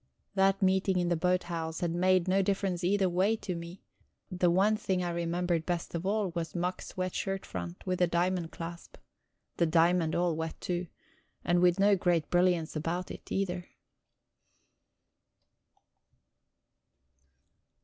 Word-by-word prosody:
That 195 0 +2
meeting 190 0 +2
in 175 -1 +1
the 175 - +2
boathouse 170 -2 -1
had 170 -2 0
made 185 0 +3
no 190 +1 +3
difference 190 -2 -1
either 195 +1 +2
way 185 +5 +2
to 190 -4 -5
me; 170 +2 -8 0.5
the 180 -1 +2
one 195 +5 +3
thing 190 -3 -1
I 175 - -1
remembered 170 0 -1
best 175 0 -3
of 170 +2 -3
all 205 -1 +1
was 170 0 -4
Mack's 180 +2 -3
wet 185 -1 -2
shirt 195 -1 -3
front, 85 -1 -7
with 185 -1 -1
a 180 - +5
diamond 175 0 0
clasp 170 0 -8 0.6
the 170 - +3
diamond 165 0 +3
all 175 -1 +1
wet, 160 0 -4
too, 175 0 -3 0.6
and 175 0 +3 0.2
no 200 +1 +5
great 175 -4 0
brilliance 175 -3 +2
about 170 +4 -2
it, - - -10
either. 180 -2 -2
180 Hz, 140 wpm, -30 LUFS, 170-185 Hz, 0.6 s, a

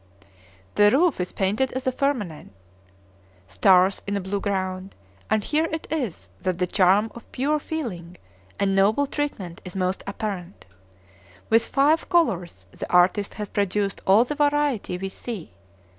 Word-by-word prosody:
The 205 0 +5
roof 310 - +3
is 180 - -3
painted 210 +7 0
as 260 +1 -4
a 260 - +2
firmament, 245 - -2 0.9
stars 190 - +4
in 200 0 -1
a - - -1
blue 195 +2 -3
ground; 190 -1 -3 0.3
and 215 -1 +1
here 310 +7 +1
it 320 -1 -4
is 210 - -3
that 185 -2 -1
the 180 - +1
charm 195 +4 +3
of 235 - -13
pure 295 +4 0
feeling 185 - -5 0.4
and 195 -1 +1
noble 210 +8 +3
treatment 215 - -4
is 180 -1 -9
most 185 0 -1
apparent. 200 -3 -5 0.9
With 225 +1 +4
five 295 +4 +2
colors 180 - +1
the - - -7
artist 185 +3 +3
has 210 -1 -4
produced 200 0 -1
all 200 +5 +6
the 295 - -3
variety 290 -9 +1
we 195 +1 -4
see. 190 - -7
200 Hz, 150 wpm, -24 LUFS, 185-265 Hz, 0.9 s, all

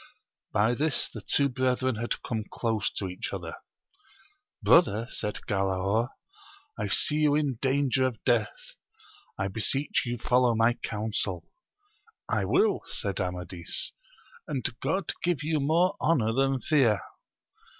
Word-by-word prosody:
By 110 +4 +3
this 150 +4 0
the - - -7
two 140 - +2
brethren 130 -1 0
had 120 +2 -3
come 110 -2 -2
close 115 -1 -1
to 95 - -2
each 90 0 -5
other: - - -5 1.1
Brother, 115 - +5
said 105 - -3
Galaor, 95 +4 +1 0.7
I - - -2
see 150 - +2
you 150 -1 +3
in 140 -6 0
danger 135 -1 +2
of 120 -5 -7
death; 115 -4 0 0.6
I 95 - -1
beseech 115 +8 0
you 120 0 -2
foUow 125 0 +3
my 115 +1 +4
counsel. 105 -6 -3 0.8
I - - 0
will, 405 +1 +3
said 100 -1 -2
Amadis, 90 -1 -3 0.6
and 135 -5 -1
God 190 -4 -1
give 170 -4 0
you 155 0 0
more 165 +7 +2
honour 120 -9 +2
than 135 0 +1
fear. 120 -10 +3
120 Hz, 130 wpm, -28 LUFS, 105-140 Hz, 1.1 s, Brother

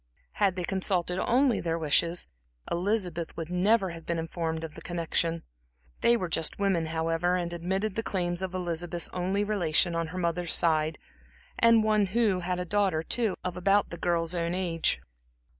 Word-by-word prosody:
Had 185 - +1
they 180 - -3
consulted 185 -1 0
only 250 +2 +2
their 165 -1 -1
wishes, 165 +2 +1 0.5
Elizabeth 180 -3 -1
would 165 0 -5
never 190 +1 +2
have 165 -1 -9
been 170 +1 -2
informed 165 0 -3
of 160 -2 -6
the - - -11
connection. 170 -1 -1 0.6
They 235 0 +4
were 185 - -2
just 165 -1 0
women, 190 -5 +1
however, 165 +2 0
and 175 -1 -2
admitted 190 +5 -2
the 225 - -1
claims 175 -4 -2
of 185 -1 -3
Elizabeth's 175 -1 -3
only 185 +3 -1
relation 175 -5 +1
on 165 0 -1
her 170 +3 -7
mother's 170 -1 +2
side, 160 -1 +2 0.6
and 230 -1 +6
one 215 -2 +3
who 205 -2 +1
had 180 0 -2
a 180 - -2
daughter, 190 -4 +1
too, 220 +2 0
of 180 -1 -3
about 195 +3 +2
the 170 - -6
girl's 170 -1 0
own 170 0 -1
age. 170 -3 0
175 Hz, 175 wpm, -28 LUFS, 165-195 Hz, 0.6 s, and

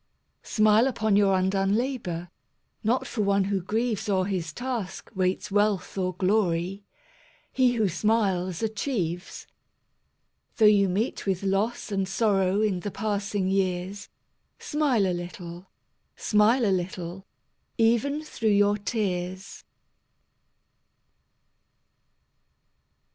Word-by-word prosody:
Smile 215 +3 +3
upon 220 -5 +1
your 200 -1 +4
undone 195 +1 +1
labour; 210 -9 -3 0.5
Not 235 +4 +1
for 220 - -3
one 200 -1 +2
who 195 0 -1
grieves 220 +3 -1
O'er 190 -2 +2
his 180 -5 -3
task 245 - -5
waits 185 +1 -1
wealth 205 -2 +1
or 185 -2 -1
glory; 190 -1 0 0.7
He 255 -2 +3
who 220 -4 +1
smiles 190 -2 0
achieves. 200 - -3 1.1
Though 220 - +5
you 200 -2 +5
meet 205 +4 -2
with 190 -1 0
loss 205 +4 -1
and 195 -1 0
sorrow 195 -1 +1
In 205 -4 +1
the 205 - -4
passing 205 -1 -2
years, 190 +1 -1 0.5
Smile 285 -9 +1
a 185 - 0
little, 175 0 -7 0.5
smile 225 +4 +3
a 195 - +3
little, 180 +1 -5 0.5
Even 235 +7 +2
through 230 -7 -2
your 205 0 +3
tears. 190 -3 -3
200 Hz, 110 wpm, -26 LUFS, 185-220 Hz, 1.1 s, Though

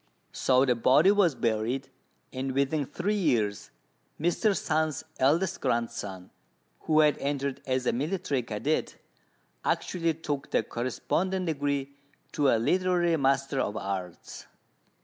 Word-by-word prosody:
So 130 0 +3
the 125 - +3
body 130 +10 +5
was 195 -8 +3
buried, 120 +4 -1 0.4
and 130 0 -3
within 140 +1 0
three 205 +5 -1
years 110 - 0 0.5
Mr. 185 +6 +1
Sung's 155 -2 -1 0.2
eldest 165 +8 +2
grandson, 100 -5 -3 0.5
who 155 -1 +3
had 150 -1 +3
entered 140 -1 -2
as 130 -1 0
a - - +2
military 150 0 -1
cadet, 120 +7 -2 0.7
actually 165 -3 0
took 150 -4 -4
the - - +1
corresponding 180 +10 -2
degree 140 -3 -1 0.4
to 145 -2 +1
a 115 - +4
literary 175 +6 +2
master 135 -1 +1
of 105 -4 -1
arts. 95 -3 -6
140 Hz, 125 wpm, -28 LUFS, 125-165 Hz, 0.7 s, body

